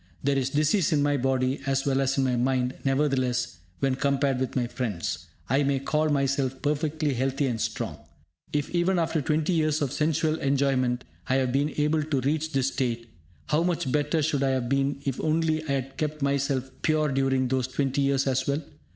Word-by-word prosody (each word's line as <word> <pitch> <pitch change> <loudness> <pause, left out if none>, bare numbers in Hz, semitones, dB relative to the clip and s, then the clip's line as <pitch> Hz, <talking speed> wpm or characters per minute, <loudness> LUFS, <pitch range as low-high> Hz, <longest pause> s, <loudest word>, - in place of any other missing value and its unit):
There 140 0 +2
is 135 -1 0
disease 155 +6 +2
in 145 -2 +3
my 145 0 +2
body 130 0 0
as 135 0 +1
well 135 -1 +2
as 135 0 0
in 135 - +3
my 130 -1 +1
mind; 125 +1 +1
nevertheless, 135 - 0 0.2
when 135 -1 +2
compared 140 -1 +1
with 130 -1 -2
my 125 -2 +1
friends, 115 -7 -3 0.2
I 135 +4 +2
may 140 -1 +2
call 155 +3 0
myself 135 -2 0
perfectly 150 0 0
healthy 135 +3 0
and 120 -4 -1
strong. - - -3 0.5
If 145 -1 -1
even 180 +2 +2
after 165 -2 +1
twenty 155 +5 +1
years 155 -2 +2
of 140 -4 -1
sensual 155 +1 +1
enjoyment, 135 -3 +1 0.3
I 130 - +3
have 130 -2 +1
been 140 +3 +1
able 150 +1 +2
to 145 -3 -1
reach 155 +4 0
this 135 -2 +1
state, 120 -3 -2 0.4
how 150 - +3
much 170 -5 0
better 150 +2 +1
should 145 -2 0
I 135 - +2
have 130 -2 0
been 140 +1 +1
if 135 -2 -2
only 155 0 +1
I 145 - -3
had 135 0 -3
kept 150 -1 -2
myself 140 -2 0
pure 155 -1 +2
during 135 -1 +1
those 130 -1 0
twenty 135 +1 -1
years 140 -1 +2
as 130 -1 0
well? 140 +3 0
140 Hz, 195 wpm, -26 LUFS, 130-150 Hz, 0.5 s, in